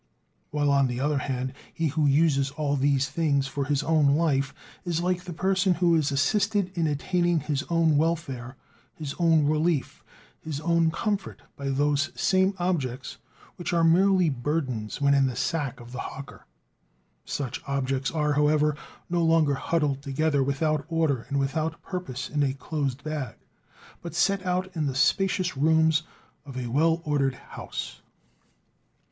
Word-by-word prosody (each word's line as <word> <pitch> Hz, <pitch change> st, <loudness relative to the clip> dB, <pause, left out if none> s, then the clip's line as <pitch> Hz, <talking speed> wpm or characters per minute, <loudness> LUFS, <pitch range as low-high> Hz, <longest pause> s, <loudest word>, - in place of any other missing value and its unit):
While, 145 Hz, -1 st, +1 dB
on 140 Hz, -1 st, +4 dB
the 120 Hz, 0 st, -3 dB
other 145 Hz, +1 st, +1 dB
hand, 130 Hz, -1 st, -3 dB, 0.2 s
he 160 Hz, -1 st, -1 dB
who 150 Hz, +1 st, +1 dB
uses 140 Hz, -1 st, +3 dB
all 145 Hz, 0 st, -1 dB
these 135 Hz, 0 st, +2 dB
things 140 Hz, -1 st, +1 dB
for 135 Hz, +1 st, -3 dB
his 145 Hz, +1 st, 0 dB
own 150 Hz, -3 st, +3 dB
life, 140 Hz, -4 st, +1 dB, 0.3 s
is 170 Hz, -3 st, -1 dB
like 180 Hz, +1 st, -1 dB
the 180 Hz, -, -6 dB
person 190 Hz, +2 st, +1 dB
who 175 Hz, 0 st, +3 dB
is 155 Hz, -3 st, +2 dB
assisted 200 Hz, +6 st, +1 dB
in 165 Hz, -2 st, +1 dB
attaining 175 Hz, +3 st, +1 dB
his 145 Hz, 0 st, -2 dB
own 165 Hz, -3 st, +3 dB
welfare, 145 Hz, -6 st, -1 dB, 0.4 s
his 150 Hz, -3 st, -5 dB
own 165 Hz, -3 st, +4 dB
relief, 155 Hz, 0 st, 0 dB, 0.4 s
his 155 Hz, -3 st, -5 dB
own 170 Hz, 0 st, +2 dB
comfort 200 Hz, +3 st, -3 dB
by 140 Hz, -1 st, -4 dB
those 145 Hz, +1 st, +1 dB
same 190 Hz, +1 st, +3 dB
objects 155 Hz, -8 st, -2 dB, 0.4 s
which 175 Hz, -, -3 dB
are 170 Hz, -1 st, +3 dB
merely 185 Hz, +2 st, +4 dB
burdens 130 Hz, -5 st, -2 dB
when 140 Hz, 0 st, +3 dB
in 135 Hz, -1 st, +4 dB
the 125 Hz, -, -3 dB
sack 140 Hz, 0 st, -2 dB
of 120 Hz, 0 st, -12 dB
the 125 Hz, -, -6 dB
hawker. 140 Hz, 0 st, -8 dB, 0.8 s
Such 130 Hz, -3 st, -4 dB
objects 135 Hz, -1 st, -1 dB
are, 150 Hz, -2 st, 0 dB
however, 150 Hz, 0 st, +3 dB, 0.3 s
no 170 Hz, -1 st, 0 dB
longer 160 Hz, -3 st, +3 dB
huddled 145 Hz, -1 st, 0 dB
together 145 Hz, +1 st, 0 dB
without 145 Hz, +2 st, 0 dB
order 155 Hz, -7 st, 0 dB
and 140 Hz, -, -1 dB
without 155 Hz, +4 st, -1 dB
purpose 135 Hz, -9 st, -5 dB
in 150 Hz, -, -1 dB
a 135 Hz, -2 st, +1 dB
closed 140 Hz, -2 st, -3 dB
bag, 150 Hz, -6 st, -4 dB, 0.7 s
but 170 Hz, -1 st, -7 dB
set 195 Hz, +2 st, +2 dB
out 185 Hz, +1 st, -1 dB
in 155 Hz, -3 st, 0 dB
the 135 Hz, -, -3 dB
spacious 185 Hz, +4 st, +2 dB
rooms 160 Hz, +2 st, +3 dB, 0.4 s
of 135 Hz, -3 st, -9 dB
a 125 Hz, -, -3 dB
well 160 Hz, +7 st, +1 dB
ordered 140 Hz, -3 st, +1 dB
house. -, -, -7 dB
150 Hz, 160 wpm, -26 LUFS, 140-165 Hz, 0.8 s, on